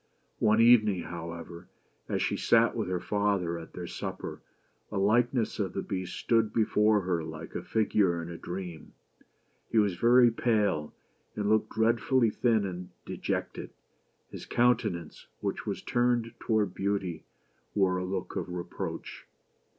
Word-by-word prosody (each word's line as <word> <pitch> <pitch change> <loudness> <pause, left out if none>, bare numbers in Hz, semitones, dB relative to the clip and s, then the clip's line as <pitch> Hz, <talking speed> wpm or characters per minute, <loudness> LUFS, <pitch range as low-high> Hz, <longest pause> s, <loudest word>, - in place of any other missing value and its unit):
One 110 +1 +4
evening, 110 -6 +5
however, 85 +1 -7 0.4
as - - 0
she - - 0
sat - - +3
with - - -2
her 90 -1 -1
father 95 -3 0
at 80 - -11
their 90 - -6
supper, - - -6 0.5
a 105 - -3
likeness 115 +4 +2
of 95 -3 -1
the 95 - -3
Beast 95 -3 -4
stood 115 -2 +2
before 105 -1 +3
her 90 -3 -1
like 80 +1 -8
a - - -3
figure 95 -2 +1
in 85 - -5
a 85 - -7
dream. 85 -2 -7 0.8
He 115 - 0
was 100 -5 +3
very 120 +2 +6
pale, 105 -10 +1 0.4
and 105 -1 -1
looked 110 0 +2
dreadfully 115 +1 +2
thin 110 -4 +2
and 90 -1 -6 0.2
dejected; - - -3 0.6
his - - -8
countenance, 115 -9 0
which - - -3
was - - -3
turned 120 -1 +1
toward 105 -5 +1
Beauty, 95 -3 -2 0.5
wore 95 -2 +3
a 90 - -2
look 95 0 -4
of - - -3
reproach. 90 -1 -6
100 Hz, 145 wpm, -29 LUFS, 90-110 Hz, 0.8 s, very